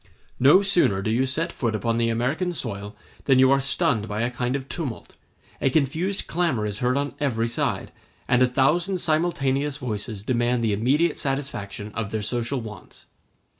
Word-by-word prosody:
No 145 +10 +6
sooner 170 - +3
do 110 - 0
you 130 +4 +2
set 165 +6 -1
foot 115 -3 -2
upon 115 +2 0
the 115 0 +2
American 140 +11 -1
soil 105 -8 -4 0.3
than 135 -2 +4
you 130 0 +6
are 135 0 +4
stunned 115 -5 +1
by 105 +1 -3
a 120 +1 0
kind 125 +1 -2
of 135 -1 -4
tumult; 135 -7 -6 0.5
a - - +3
confused 160 +8 0
clamor 160 -11 0
is 105 -1 -4
heard 125 +2 +1
on 140 0 -2
every 115 -6 0
side; 120 - -2 0.4
and 125 0 +3
a 130 - +6
thousand 155 +9 +2
simultaneous 150 -4 0
voices 110 -5 -4
demand 120 0 +1
the 110 -2 +1
immediate 140 +10 +1
satisfaction 120 -7 -3
of 110 -3 -3
their 110 0 -3
social 120 +4 -1
wants. 105 -3 -11
125 Hz, 175 wpm, -24 LUFS, 115-145 Hz, 0.5 s, No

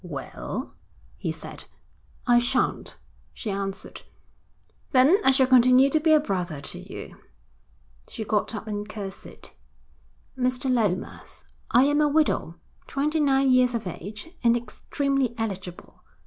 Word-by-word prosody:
'Well?' - - -6 0.4
he - - -3
said. - - -9 0.6
'I 240 -1 +5
shan't,' 245 +1 -1 0.4
she 215 - -4
answered. 195 0 -5 0.9
'Then 270 +8 +6
I - - +6
shall 265 0 +5
continue 255 +1 +5
to 310 - +4
be 315 +1 +2
a 310 - +7
brother 180 - -3
to 145 - -5
you.' - - -9 0.9
She 225 - -5
got 210 +2 0
up 210 - -6
and 210 -1 -5
curtsied. 195 -3 -8 0.9
'Mr. 255 0 0
Lomas, 210 -7 -2 0.3
I 245 - +5
am 290 +2 +3
a 300 - +4
widow, 295 - +1 0.3
twenty 300 +3 -1
nine 270 -2 +3
years 250 -1 +4
of 230 - -3
age, 205 - -7
and 235 0 +4
extremely 275 +1 -2
eligible. 190 -5 -6
245 Hz, 135 wpm, -25 LUFS, 205-275 Hz, 0.9 s, a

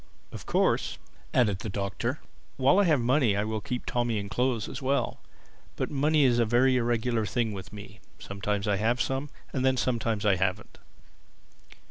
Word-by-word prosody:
"Of - - -9
course," - - +1 0.3
added 105 -7 +2
the 110 - -5
Doctor, 100 +7 -3 0.4
"while 140 +8 +4
I 205 - +4
have 155 -5 +3
money 120 -3 +2
I 100 - +1
will 110 0 -3
keep 125 +3 -4
Tommy 120 -2 0
in 100 -1 -4
clothes 125 -1 0
as 135 - -7
well. 135 +1 0 0.6
But - - -3
money 150 +1 +3
is 120 -3 +3
a - - +5
very 125 +3 +3
irregular 120 -1 0
thing 115 +1 -1
with 95 -3 -8
me; 105 0 -11 0.2
sometimes 100 +1 -3
I 100 -1 +2
have 115 +4 +1
some, 135 +3 -1 0.2
and 130 - -1
then 130 0 +3
sometimes 115 -4 -1
I 100 -3 +4
haven't." 95 +3 -2
120 Hz, 175 wpm, -28 LUFS, 105-130 Hz, 0.6 s, a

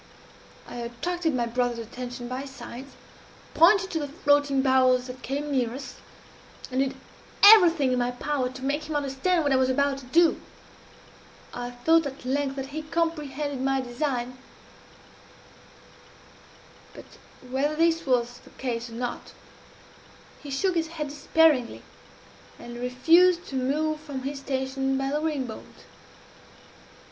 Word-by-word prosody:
I - - -8
attracted 310 +7 -2
my 240 -1 0
brother's 240 0 -1
attention 245 +2 -7
by 255 +2 -5
signs, 265 0 -10 0.6
pointed 380 +3 +5
to 325 - -1
the 290 - -3
floating 285 -3 +2
barrels 255 -1 +3
that 255 0 -9
came 285 +3 -3
near 250 -3 0
us, 270 -2 -8 0.7
and 255 - -1
did 270 0 0 0.5
everything 345 -10 +8
in 250 - +1
my 245 0 +1
power 255 +1 -2
to 260 +1 -8
make 290 +3 -1
him 310 - -3
understand 290 +5 0
what 285 - +1
I 265 - +4
was 260 0 +2
about 275 +1 +1
to 265 - -13
do. 335 +5 +3 1.1
I 245 0 -5
thought 315 +6 +2
at 270 -1 -10
length 270 +1 -1
that 270 0 -5
he 310 - -3
comprehended 300 -4 -2
my 270 0 +1
design 255 -1 -3 2.6
but, - - -11 0.4
whether 275 +4 -1
this 330 +1 +2
was 245 -1 0
the - - -18
case 240 -2 -3
or - - -12
not, 240 +1 -5 1.1
he 290 - -9
shook 360 +8 0
his 330 -2 0
head 315 -3 -5
despairingly, 295 -3 +2 0.7
and 240 0 -9
refused 330 +9 +4
to 275 - -6
move 300 +4 0
from 285 -4 -7
his 275 +1 -4
station 265 0 -2
by 270 0 -2
the 300 +1 -1
ring 300 -4 -1
bolt. 220 -3 -11
270 Hz, 145 wpm, -26 LUFS, 250-305 Hz, 2.6 s, everything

